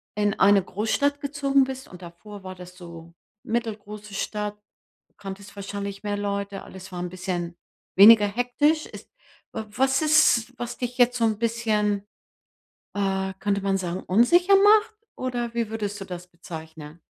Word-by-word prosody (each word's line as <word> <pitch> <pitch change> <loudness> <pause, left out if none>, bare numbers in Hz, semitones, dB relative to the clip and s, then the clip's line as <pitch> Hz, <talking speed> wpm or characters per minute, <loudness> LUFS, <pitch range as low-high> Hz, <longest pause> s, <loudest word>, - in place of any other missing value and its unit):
in 205 -1 0
eine 200 0 +5
Großstadt 280 +10 -1
gezogen 280 -1 +2
bist 265 0 -7
und 180 0 -13
davor 195 +4 -11
war 185 0 -7
das 180 0 -12
so 170 -2 -11 0.3
mittelgroße 210 -2 -4
Stadt, 210 +1 -3 0.6
kanntest 195 0 -9
wahrscheinlich 200 0 -6
mehr 205 -1 -2
Leute, 200 -1 -3
alles 190 0 -11
war 180 - -5
‘n 180 - -3
bisschen 180 -2 -4 0.4
weniger 210 +1 +9
hektisch. 245 +8 +1
Ist - - -12 0.4
wa 220 -1 -5
was 265 +5 +1
ist, 295 -6 +4
was 240 -1 -5
dich 245 0 -4
jetzt 245 0 +4
so 230 - +1
‘n 220 -2 +1
bisschen, 215 -3 0 0.9
äh, 190 -1 -1
könnte 200 0 0
man 195 -1 +1
sagen, 180 0 -4
unsicher 345 - +4
macht? 430 +2 +5 0.2
Oder 240 -2 -3
wie 235 -2 -1
würdest 205 -2 -4
du - - -5
das 180 -1 -7
bezeichnen? 160 -2 -10
205 Hz, 155 wpm, -25 LUFS, 190-240 Hz, 0.9 s, weniger